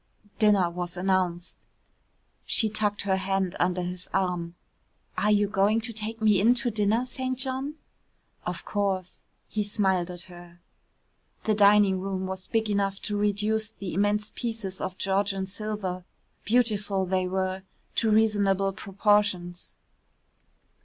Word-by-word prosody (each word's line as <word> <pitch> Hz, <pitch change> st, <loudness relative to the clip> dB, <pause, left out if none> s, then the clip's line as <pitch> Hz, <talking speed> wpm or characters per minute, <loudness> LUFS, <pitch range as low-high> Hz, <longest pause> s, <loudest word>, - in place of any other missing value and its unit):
Dinner 205 Hz, -4 st, +5 dB
was 175 Hz, 0 st, -5 dB
announced. 180 Hz, -2 st, -1 dB, 0.8 s
She 220 Hz, -, +2 dB
tucked 210 Hz, -1 st, 0 dB
her 190 Hz, -1 st, +1 dB
hand 190 Hz, -1 st, -1 dB
under 180 Hz, 0 st, +1 dB
his 180 Hz, 0 st, -5 dB
arm. 180 Hz, -3 st, -1 dB, 0.6 s
"Are 210 Hz, -, +1 dB
you 205 Hz, -1 st, +4 dB
going 205 Hz, +2 st, +2 dB
to 230 Hz, 0 st, -4 dB
take 220 Hz, +1 st, -4 dB
me 210 Hz, -3 st, +4 dB
in 235 Hz, +4 st, +5 dB
to 245 Hz, 0 st, 0 dB
dinner, 215 Hz, +3 st, +1 dB
St. 255 Hz, 0 st, -3 dB
John?" 265 Hz, +3 st, -3 dB, 0.7 s
"Of 175 Hz, -1 st, -4 dB
course," 195 Hz, -3 st, -2 dB, 0.3 s
he 210 Hz, -, -1 dB
smiled 190 Hz, -4 st, +1 dB
at 175 Hz, -1 st, -7 dB
her. 175 Hz, -1 st, -13 dB, 0.8 s
The 215 Hz, -, +2 dB
dining 205 Hz, -2 st, +5 dB
room 190 Hz, -1 st, -3 dB
was 190 Hz, 0 st, -5 dB
big 225 Hz, -1 st, 0 dB
enough 200 Hz, -1 st, 0 dB
to 210 Hz, -, -2 dB
reduce 210 Hz, +1 st, 0 dB
the 195 Hz, -4 st, -6 dB
immense 205 Hz, +3 st, +1 dB
pieces 225 Hz, -6 st, -4 dB
of 185 Hz, -, -4 dB
Georgian 195 Hz, 0 st, 0 dB
silver 195 Hz, -2 st, -4 dB, 0.4 s
beautiful 210 Hz, -5 st, +1 dB
they 185 Hz, 0 st, 0 dB
were 185 Hz, 0 st, -1 dB, 0.4 s
to 225 Hz, -, +3 dB
reasonable 200 Hz, -3 st, +3 dB
proportions. 195 Hz, -3 st, 0 dB
200 Hz, 135 wpm, -27 LUFS, 185-215 Hz, 0.8 s, Dinner